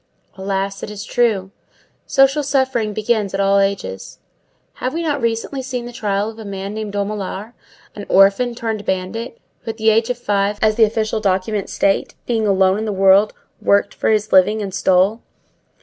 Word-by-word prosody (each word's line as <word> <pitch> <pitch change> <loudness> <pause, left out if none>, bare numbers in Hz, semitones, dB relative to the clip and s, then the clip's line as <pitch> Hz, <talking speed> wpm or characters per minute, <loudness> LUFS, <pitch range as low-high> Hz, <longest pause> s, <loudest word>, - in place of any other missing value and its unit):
Alas! 195 0 -3
it - - -6
is 210 -1 -7
true. 215 -6 0 0.6
Social 270 +2 +3
suffering 265 -6 0
begins 215 -2 -1
at - - -3
all 200 0 +3
ages. 195 - -2 0.6
Have 255 +4 -2
we 335 - -2
not 290 -4 -1
recently 230 +4 -2
seen 250 -2 -4
the 240 - -7
trial 205 -2 -1
of 225 0 -8
a - - -7
man 200 0 -5
named 215 -1 -5
Dumollard, 205 +1 -4 0.4
an 205 - -9
orphan 200 +6 +4
turned 225 -3 -3
bandit, 200 - -3 0.2
who, - - -37
from - - -23
the 220 0 +3
age 225 +2 +2
of 250 - -1
five, 205 -3 0
as 215 0 +3
the 225 0 +5
official 220 0 -1
documents 195 0 -1
state, 195 0 0
being 225 -3 0
alone 190 0 +3
in 220 - -3
the 215 - -2
world, 195 +1 +4 0.3
"worked 200 - +2
for - - -1
his 215 0 +1
living 195 +3 +5
and 200 -3 -4
stole"? 190 +4 +2
210 Hz, 180 wpm, -19 LUFS, 195-230 Hz, 0.6 s, the